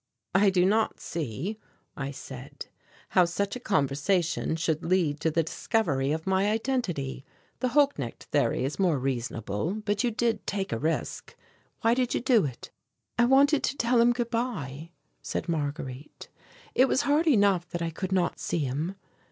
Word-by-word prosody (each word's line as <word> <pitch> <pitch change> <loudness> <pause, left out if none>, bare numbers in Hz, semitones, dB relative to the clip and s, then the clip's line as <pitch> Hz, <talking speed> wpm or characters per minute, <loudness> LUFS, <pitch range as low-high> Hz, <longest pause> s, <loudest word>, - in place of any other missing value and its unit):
"I 195 +1 +5
do 180 -1 +3
not 215 +3 +2
see," 165 - -4 0.4
I 135 0 -3
said, 135 -1 -9 0.4
"how 180 - +5
such 200 +5 -2
a - - -5
conversation 165 - +1
should 160 -1 -1
lead 165 -5 +1
to 160 - +1
the 165 +1 +1
discovery 145 - 0
of 160 +1 -2
my 190 +1 +2
identity 210 - -2 0.4
the 255 - +1
Holknecht 250 - +1
theory 130 - +2
is 140 - -4
more 175 -6 +3
reasonable 120 - -2
but 205 +2 +1
you 245 - +2
did 225 -2 -1
take 195 -1 -2
a 115 - -1
risk. 160 +5 -2 0.5
Why 230 +1 +4
did 250 0 0
you - - +1
do 235 - +3
it?" 130 -4 -7 0.5
"I 235 - +6
wanted 275 +3 +5
to 280 - -1
tell 235 0 +3
him 240 +1 +5
good 240 -1 -2
bye," 165 - -3 0.3
said - - -4
Marguerite. 145 -4 -4 0.4
"It 260 - +5
was 260 - +2
hard 300 +4 +2
enough 200 - +3
that 170 0 -3
I 165 - -2
could 190 +3 -4
not 185 -2 +1
see - - -2
him." 150 +9 -2
180 Hz, 170 wpm, -28 LUFS, 145-230 Hz, 0.5 s, I